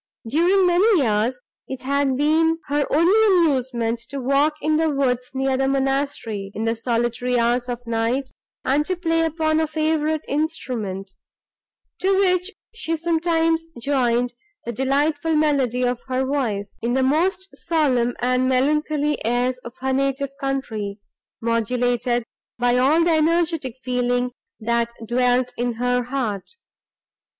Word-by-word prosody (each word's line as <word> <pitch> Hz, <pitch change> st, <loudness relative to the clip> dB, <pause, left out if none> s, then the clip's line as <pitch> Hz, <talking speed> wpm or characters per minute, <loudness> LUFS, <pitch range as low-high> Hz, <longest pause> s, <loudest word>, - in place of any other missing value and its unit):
During 350 Hz, -, +3 dB
many 360 Hz, -1 st, +4 dB
years, 225 Hz, +2 st, 0 dB, 0.3 s
it 265 Hz, -1 st, -6 dB
had 275 Hz, -1 st, +1 dB
been 320 Hz, +3 st, +3 dB
her 290 Hz, 0 st, +1 dB
only 375 Hz, +9 st, +4 dB
amusement 260 Hz, -, +1 dB
to 280 Hz, +1 st, -5 dB
walk 280 Hz, +4 st, +2 dB
in 305 Hz, +1 st, +1 dB
the 320 Hz, 0 st, +2 dB
woods 255 Hz, -3 st, 0 dB
near 265 Hz, 0 st, +1 dB
the 270 Hz, 0 st, +1 dB
monastery, 270 Hz, -7 st, -1 dB
in 220 Hz, -, -3 dB
the 225 Hz, -, +1 dB
solitary 240 Hz, +1 st, -1 dB
hours 240 Hz, +1 st, +1 dB
of 245 Hz, 0 st, -5 dB
night, 235 Hz, +4 st, -1 dB, 0.3 s
and 280 Hz, +3 st, +2 dB
to 370 Hz, -, 0 dB
play 330 Hz, -2 st, 0 dB
upon 315 Hz, -1 st, +1 dB
a 320 Hz, -, +1 dB
favourite 310 Hz, 0 st, 0 dB
instrument, 235 Hz, -, -3 dB, 0.9 s
to 385 Hz, +1 st, +2 dB
which 365 Hz, -1 st, +2 dB, 0.2 s
she 330 Hz, -8 st, -2 dB
sometimes 330 Hz, 0 st, +1 dB
joined 245 Hz, -2 st, +1 dB, 0.3 s
the 235 Hz, -, -2 dB
delightful 290 Hz, +5 st, 0 dB
melody 275 Hz, -5 st, +1 dB
of 245 Hz, -1 st, 0 dB
her 260 Hz, 0 st, 0 dB
voice, 230 Hz, -8 st, -2 dB
in 240 Hz, +2 st, 0 dB
the 265 Hz, -, +2 dB
most 360 Hz, +7 st, +1 dB
solemn 260 Hz, -7 st, +1 dB
and 255 Hz, +1 st, +2 dB
melancholy 295 Hz, +3 st, +1 dB
airs 245 Hz, +2 st, 0 dB
of 240 Hz, 0 st, -11 dB
her 265 Hz, 0 st, 0 dB
native 275 Hz, +1 st, 0 dB
country, 230 Hz, -8 st, -3 dB, 0.4 s
modulated 240 Hz, +1 st, 0 dB, 0.3 s
by 245 Hz, 0 st, +2 dB
all 280 Hz, +7 st, +4 dB
the 340 Hz, -, +2 dB
energetic 320 Hz, -5 st, +1 dB
feeling, 245 Hz, -1 st, -1 dB, 0.3 s
that 235 Hz, +1 st, 0 dB
dwelt 250 Hz, +1 st, +1 dB
in 240 Hz, 0 st, 0 dB
her 245 Hz, +2 st, 0 dB
heart. 245 Hz, -, -3 dB
265 Hz, 140 wpm, -22 LUFS, 245-310 Hz, 0.9 s, many